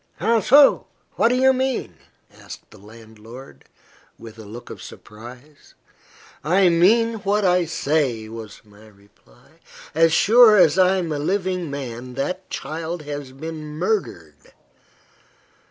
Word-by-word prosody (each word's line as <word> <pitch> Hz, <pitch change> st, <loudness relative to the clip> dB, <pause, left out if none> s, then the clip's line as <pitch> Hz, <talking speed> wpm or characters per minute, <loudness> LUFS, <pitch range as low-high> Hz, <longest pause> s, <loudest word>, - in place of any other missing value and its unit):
"How 230 Hz, 0 st, +1 dB
so? 275 Hz, +7 st, +4 dB, 0.2 s
What -, -, +1 dB
do 245 Hz, -, +1 dB
you 265 Hz, +1 st, +3 dB
mean?" 260 Hz, -, -3 dB, 0.4 s
asked -, -, -13 dB
the -, -, -16 dB
landlord, 110 Hz, -, -15 dB, 0.5 s
with 115 Hz, -1 st, -13 dB
a 110 Hz, -, -11 dB
look 120 Hz, +4 st, -11 dB
of -, -, -10 dB
surprise. 120 Hz, +7 st, -14 dB, 0.7 s
"I 185 Hz, +4 st, +3 dB
mean 225 Hz, +7 st, +2 dB
what 205 Hz, +1 st, -1 dB
I 180 Hz, -1 st, +2 dB
say," 145 Hz, -8 st, -2 dB
was 110 Hz, -2 st, -10 dB
my 105 Hz, +1 st, -19 dB
reply. 100 Hz, -, -25 dB, 0.3 s
"As 165 Hz, +1 st, +3 dB
sure 220 Hz, +5 st, +5 dB
as 180 Hz, -1 st, +4 dB
I 185 Hz, +1 st, +4 dB
am 170 Hz, -3 st, -3 dB
a 150 Hz, -, -3 dB
living 180 Hz, +1 st, -2 dB
man, 125 Hz, -3 st, -7 dB
that 180 Hz, +8 st, -5 dB
child 160 Hz, +1 st, -6 dB
has 145 Hz, -2 st, -7 dB
been 155 Hz, +3 st, -8 dB
murdered." 90 Hz, -, -4 dB
155 Hz, 135 wpm, -21 LUFS, 115-190 Hz, 0.7 s, sure